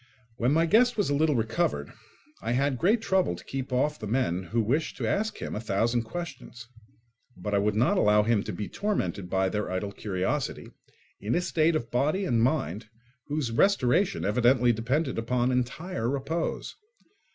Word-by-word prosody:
When 120 +3 +1
my 165 +3 +3
guest 235 +7 +4
was 205 -8 +1
a - - +2
little 150 0 +2
recovered 115 +9 -1 0.5
I 115 - -1
had 135 0 +1
great 215 +6 +3
trouble 190 - +1
to - - -12
keep 135 -1 -5
off 145 +4 0
the 105 - -5
men, 95 -6 0
who 115 +7 -1
wished 140 +9 -1
to - - -2
ask 220 +2 -1
him - - -5
a - - -2
thousand 115 +3 +1
questions; 125 -5 -7 0.7
but 105 +3 -4
I 100 - +4
would 105 +1 +1
not 115 +4 +3
allow 105 0 +4
him 110 -1 +2
to - - -3
be 105 - -5
tormented 100 - -2
by 95 0 +1
their 105 +1 -2
idle 95 +2 -3
curiosity, 95 -3 -3 0.5
in 105 +3 -1
a 175 - +2
state 165 -2 +2
of 115 -6 -3
body 150 +10 +1
and 115 -7 +2
mind 110 - 0 0.4
whose 145 -5 -2
restoration 190 - +2
evidently 120 +3 +3
depended 130 +5 -1
upon 125 +2 0
entire 125 +2 -2
repose. 150 +5 -3
125 Hz, 175 wpm, -27 LUFS, 110-160 Hz, 0.7 s, guest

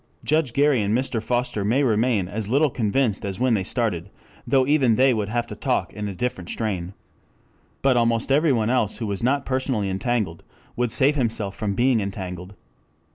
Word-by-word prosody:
Judge 155 -5 +1
Gary 140 -3 +3
and 105 +3 +1
Mr. 130 -3 -2
Foster 120 -3 -1
may 120 +8 +2
remain 110 -5 +1
as 105 +2 -4
little 140 +3 +3
convinced 115 -1 0
as 100 0 -4
when 130 -1 +2
they 100 -4 +1
started, 100 -5 -2 0.4
though 135 -2 +3
even 135 -5 +3
they 130 +2 +4
would 105 -3 -2
have 120 +1 -1
to - - -8
talk - - -1
in 105 0 -4
a 100 - -5
different 90 -5 -3
strain. 95 -5 -3 0.9
But 135 -2 +4
almost 115 +1 +1
everyone 135 -6 +3
else 120 -5 +1
who 115 - -4
was 100 -2 -3
not 140 +3 +1
personally 130 -7 -1
entangled 100 -4 -2 0.3
would 120 -1 -1
save 140 +5 +3
himself 110 -6 -1
from 100 -2 -2
being 125 0 +3
entangled. 95 -1 -6
115 Hz, 185 wpm, -23 LUFS, 100-130 Hz, 0.9 s, they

